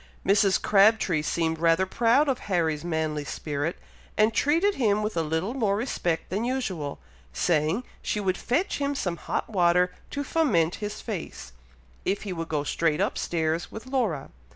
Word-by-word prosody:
Mrs. 195 -1 +4
Crabtree 200 -5 +4
seemed 160 +1 -1
rather 165 +2 +3
proud 240 +9 +3
of 265 -2 0
Harry's 160 -4 +1
manly 160 -3 -1
spirit, 145 +2 -3 0.4
and 215 +1 +4
treated 330 - +3
him 215 - +1
with 210 -2 -2
a 165 - +2
little 160 +8 -1
more 215 -7 +1
respect 180 -9 -2
than 200 +4 -1
usual, 195 - -2 0.4
saying, 165 - +1 0.2
she 210 - -1
would 190 -2 0
fetch 290 - -1
him 285 0 -1
some 180 -10 -2
hot - - -3
water 180 -3 +3 0.2
to 285 - -3
foment 210 - +2
his 210 0 -4
face, 195 - -6 0.5
if 200 - -1
he 200 -3 -4
would 165 -1 -5
go 150 -2 0
straight 155 +1 0
up - - 0
stairs 165 0 -1
with 220 - -8
Laura. 235 - -1
185 Hz, 165 wpm, -26 LUFS, 160-225 Hz, 0.5 s, Mrs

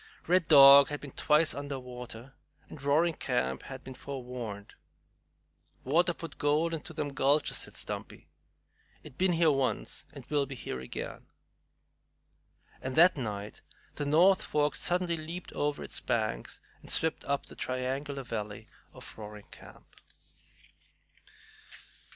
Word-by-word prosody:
Red 175 -1 +3
Dog 140 -2 +9
had 145 0 -4
been 140 - -9
twice 155 +3 +3
under 140 -1 -5
water, 125 0 -9 0.3
and 145 - -11
Roaring 155 +5 +3
Camp 65 - -1
had 135 -1 -9
been 130 - -8
forewarned. 125 -7 -7 1.1
"Water 170 +6 +2
put 165 -2 -7
the - - -17
gold 150 +3 +1
into 160 +1 -5
them 150 -3 -4
gulches," 140 +3 +2
said - - -4
Stumpy. - - -5 0.8
"It 145 -3 -14
been 185 -1 +3
here 165 -2 +4
once 130 - -2
and - - -11
will 145 -2 0
be 135 - -7
here 65 - -5
again!" 65 - -7 1.5
And 130 0 -4
that 175 +3 +7
night 105 -6 -5 0.3
the 145 - -4
North 180 +6 +5
Fork 150 0 0
suddenly 175 -1 0
leaped 165 +3 -7
over 145 0 -1
its - - -5
banks - - -2 0.2
and - - -10
swept 160 -1 +2
up 140 0 -1
the - - -11
triangular 135 +2 -3
valley 105 -4 -5 0.3
of - - -11
Roaring 105 -1 -10
Camp. - - -14
140 Hz, 140 wpm, -30 LUFS, 125-155 Hz, 1.5 s, Dog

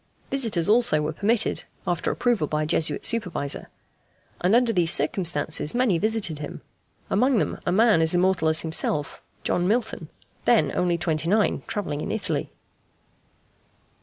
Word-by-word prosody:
Visitors 225 -11 +1
also 220 -8 +3
were 150 +1 -3
permitted, 220 +6 0 0.2
after 175 -3 -1
approval 235 -11 0
by 150 +1 -2
a - - -2
Jesuit 155 -1 +1
supervisor; 180 -11 -2 0.7
and 185 +5 +3
under 240 -1 +2
these 175 -4 +1
circumstances 155 0 +1
many 240 -9 +1
visited 210 -7 -1
him, 150 - -8 0.5
among 250 +5 +2
them - - -2
a - - +2
man 215 -2 +3
as 160 +2 +4
immortal 180 -2 +1
as 160 0 +4
himself 155 -2 -1 0.2
John 175 0 0
Milton, 225 +2 -2 0.4
then - - +3
only 175 -1 0
twenty 165 -1 -1
nine, 210 +2 +1
travelling 150 -8 -4
in - - -4
Italy. 220 -2 -1
180 Hz, 145 wpm, -24 LUFS, 160-220 Hz, 0.7 s, as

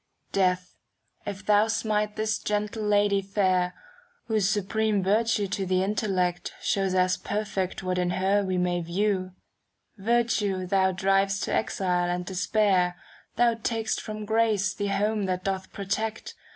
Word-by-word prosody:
^ - - -39
Death, 180 -1 +1 0.5
if 200 0 -5
thou 210 +1 +4
smite 210 -1 0
this 215 0 -1
gentle 210 +1 -2
lady 205 -1 +3
fair. 185 -2 +1 0.5
Whose 215 -4 +1
supreme 210 0 0
virtue 210 +2 +2
to 195 +1 -2
the 185 0 +1
intellect 185 -4 -1
Shows 195 -2 0
as 185 0 +3
perfect 200 -3 -3
what 185 0 -1
in 180 -1 +1
her 195 +3 +1
we 185 -1 -1
may 180 -1 0
view, 185 +2 -1 0.7
Virtue 210 -4 +1
thou 190 0 +2
driv'st 195 +1 +1
to - - -2
exile 180 -4 0
and 180 0 -2
despair, 185 -1 +1 0.4
Thou 240 -1 +4
tak'st 225 0 -2
from 215 0 -6
grace 215 -2 +2
the 205 - -3
home 205 +1 0
that 185 0 -2
doth 190 -1 -3
protect. 215 +3 -3
195 Hz, 145 wpm, -26 LUFS, 185-210 Hz, 0.7 s, thou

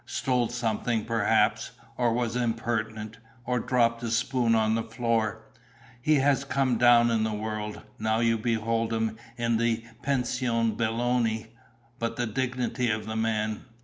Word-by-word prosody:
Stole 125 -2 0
something, 115 -1 -1
perhaps. 115 -3 +1 0.2
Or 120 -2 +2
was 120 0 -1
impertinent. 110 -2 -2 0.3
Or 125 -1 0
dropped 115 -1 +1
a 120 - -3
spoon 120 0 +1
on 110 0 +2
the 115 - +1
floor. 115 -1 -1 0.6
He 155 +4 +3
has 140 0 +3
come 135 -3 0
down 120 -1 +6
in 110 -1 +2
the 110 - 0
world. 105 0 -4 0.2
Now 110 +1 +1
you 115 -1 +2
behold 115 0 0
him 110 -1 -1 0.2
in 115 -1 +1
the 115 0 0 0.2
Pension 120 -4 0
Belloni. 115 -1 0 0.5
But 115 0 -2
the 120 - -1
dignity 125 +1 -1
of 105 -1 -1
the 110 0 -4
man!" 110 -1 -1
115 Hz, 145 wpm, -27 LUFS, 110-120 Hz, 0.6 s, down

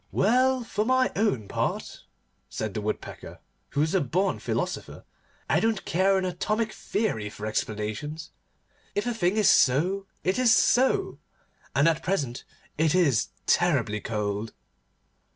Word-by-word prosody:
'Well, 255 +3 +3
for 210 -2 -1
my 255 +2 +2
own 165 - 0
part,' - - -3 0.4
said 105 - -4
the 110 - -3
Woodpecker, 105 +1 -5 0.3
who 145 - -1
was 155 +1 +1
a 190 - +3
born 180 +8 0
philosopher, - - -4 0.4
'I - - +3
don't 225 -3 0
care 190 +2 +2
an 190 - 0
atomic 215 +5 -1
theory 155 - -2
for 105 +1 -8
explanations. 110 +9 -3 0.6
If 205 - 0
a 240 - -1
thing 190 -2 0
is 215 - +4
so, 180 +10 +3 0.2
it 185 +6 0
is 250 -3 +5
so, 265 - +2 0.6
and 145 +3 +4
at 165 0 +2
present 140 -11 -2 0.3
it 160 +1 +3
is 145 -11 +3 0.2
terribly 130 -12 +2
cold. 105 0 -3
175 Hz, 140 wpm, -26 LUFS, -, 0.6 s, is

